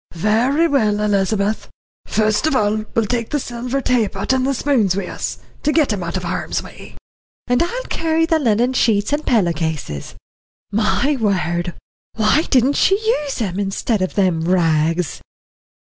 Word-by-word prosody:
"Very 235 - +2
well, 215 -9 +1
Elizabeth. 205 0 0 0.4
Fust 215 +6 +1
of 310 - +1
all, 215 -2 +1
we'll 225 - +2
take 230 +1 -2
the 295 - 0
silver 250 +2 -3
taypot 220 -2 0
and 260 0 +1
the 275 - 0
spoons 235 -9 +1
wi' 200 - -2
us, - - -4 0.2
to 300 - +1
get 300 -8 +2
'em 200 - -3
out 170 +1 -3
of 185 - -5
harm's 175 - -2
way." - - -12 0.5
"And 245 0 +1
I'll 480 +9 -2
carry 325 -4 0
the 325 -1 +2
linen 240 -1 +2
sheets 215 -1 +2
and 300 +1 0
pillow 200 - +2
cases. 155 - -4 0.6
My 225 +7 +1
word! 175 -4 -1 0.4
why 220 +7 +3
didn't 265 +1 +3
she 385 - +4
use 405 - -1
'em, 190 -1 -3
instead 200 +2 -1
of 185 - -2
them 185 -5 +2
rags?" 165 -3 +1
215 Hz, 160 wpm, -19 LUFS, 190-270 Hz, 0.6 s, she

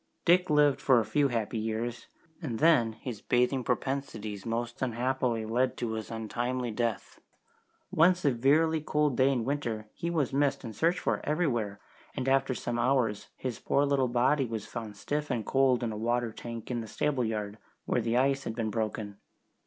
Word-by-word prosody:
Dick 180 +1 +4
lived 150 -2 +4
for 130 -3 +5
a 110 - 0
few 140 +7 +2
happy 115 -2 -2
years, 115 +2 -3 0.3
and 125 -9 -3
then 130 -8 +4
his 110 -1 -7
bathing 125 +1 +1
propensities 115 -5 -3
most 120 +1 -3
unhappily 125 -2 0
led 125 +4 0
to 120 -2 -2
his 110 -1 -4
untimely 120 +2 -2
death. 115 0 -3 0.7
One 175 +3 +5
severely 155 +2 +2
cold 150 -2 +1
day 130 +2 +4
in 120 -4 -1
winter 120 -6 -2
he 170 - -3
was 155 -6 0
missed 140 0 +1
and 115 -3 -7
searched 165 - +2
for - - -1
everywhere, 120 - 0 0.4
and 130 - -3
after 135 -1 +2
some 120 -1 -3
hours 120 -5 +1
his 125 -4 -4
poor 140 - +2
little 140 -2 +2
body 125 +3 +2
was 110 -2 -4
found 110 -3 -7
stiff 150 +6 -2
and 120 -5 -1
cold 130 -2 +3
in 115 - -1
a 105 - -5
water 120 +1 0
tank 115 +1 -7
in 120 -1 -1
the 110 - -7
stable 140 +3 0
yard, 105 -1 -3 0.3
where 125 - +1
the 115 +1 0
ice 135 +1 +2
had 115 - -3
been 110 -2 -2
broken. 105 -2 -3
120 Hz, 180 wpm, -29 LUFS, 115-140 Hz, 0.7 s, for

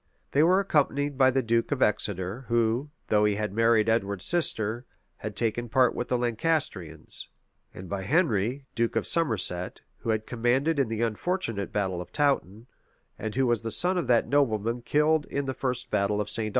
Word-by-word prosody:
They 145 - +3
were 180 +4 +5
accompanied 145 -6 +1
by 130 -1 +5
the 130 0 +1
duke 115 +2 0
of 140 -2 +2
Exeter, 105 +2 -1
who, 115 +4 +1 0.2
though 105 -1 +3
he 105 -1 +2
had 105 -1 -3
married 115 0 +3
Edward's 100 -4 0
sister, 120 -9 0 0.3
had 105 -1 -6
taken 120 +2 -1
part 125 +1 +3
with 120 - -3
the 125 - +1
Lancastrians; 120 - -2 0.4
and 95 - -10
by 95 +3 -3
Henry, 130 - +1
duke 115 0 -1
of - - 0
Somerset, 100 - -1 0.2
who - - -6
had 110 -1 0
commanded 130 +6 +1
in 135 - +2
the 115 +1 -2
unfortunate 115 - -2
battle 95 -4 -1
of 90 - -10
Touton, 120 - 0 0.5
and 110 +1 -4
who 135 0 +2
was 120 -2 +1
the 115 - -4
son 180 - +3
of 175 -8 -1
that 120 -2 +3
nobleman 120 -3 +1
killed 150 +3 +2
in 140 0 -2
the 135 - -2
first 130 -2 -3
battle 105 0 +1
of 105 0 -2
St. 115 -2 0
Albans. - - -2
115 Hz, 190 wpm, -27 LUFS, 105-135 Hz, 0.5 s, were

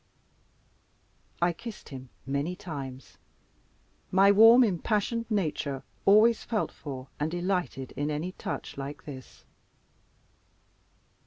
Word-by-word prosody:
I 175 0 +3
kissed 230 +4 -9
him 130 -2 -9 0.2
many 140 +6 -1
times. 140 -9 -8 0.9
My 195 +2 +6
warm 225 +5 +8
impassioned 215 +3 0
nature 155 - -1 0.2
always 215 +3 +6
felt 220 -3 -1
for 135 -3 -8
and 150 +1 0
delighted 175 -6 -2
in 145 +1 -2
any 155 +5 -2
touch 160 - -6
like 140 +2 -6
this. 130 -3 -11
175 Hz, 100 wpm, -28 LUFS, 140-210 Hz, 0.9 s, warm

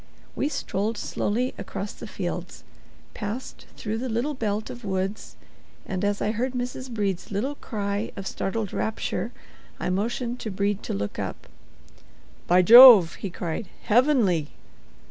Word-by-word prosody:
We 290 - 0
strolled 220 -6 -2
slowly 240 +5 -1
across 200 +1 -5
the - - -9
fields, - - -5 0.5
passed 220 +4 -6
through 220 +1 -3
the 255 +1 -3
little 240 +7 -1
belt 215 -4 -2
of 240 0 -10
woods 195 +1 -3 0.5
and, 185 0 -3
as 205 0 0
I 210 - +1
heard 245 +4 -2
Mrs. 250 +1 -4
Brede's 200 -6 -2
little 215 +8 -2
cry 205 -5 -3
of 195 - -7
startled 205 +1 -3
rapture, 220 0 -2 0.5
I - - -1
motioned 235 +5 -2
to 220 - -4
Brede 200 +1 -1
to - - -4
look 100 +1 -4
up. - - -5 1.0
"By 180 +1 +5
Jove!" 230 -4 +10
he 200 - -3
cried, 175 +3 -4 0.2
"heavenly!" 220 - +3
210 Hz, 145 wpm, -25 LUFS, 195-240 Hz, 1.0 s, Jove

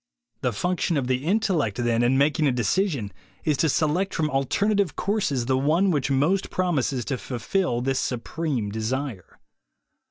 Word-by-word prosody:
The - - +1
function 175 - 0
of 135 - 0
the 130 +1 -1
intellect, 175 - +1
then, 120 -1 +1
in 125 +2 +3
making 150 +2 +3
a - - +3
decision, 125 - 0 0.3
is 150 - +2
to 160 - +2
select 165 +7 0
from 155 -1 0
alternative 195 +5 +1
courses 185 - 0
the 130 +1 +1
one 165 +8 +2
which 145 -4 0
most 150 +9 +1
promises 140 -9 0
to 135 -4 -2
fulfill 125 +2 -1
this 135 +1 0
supreme 125 -3 -2
desire. 110 -1 -4
140 Hz, 155 wpm, -25 LUFS, 125-175 Hz, 0.3 s, in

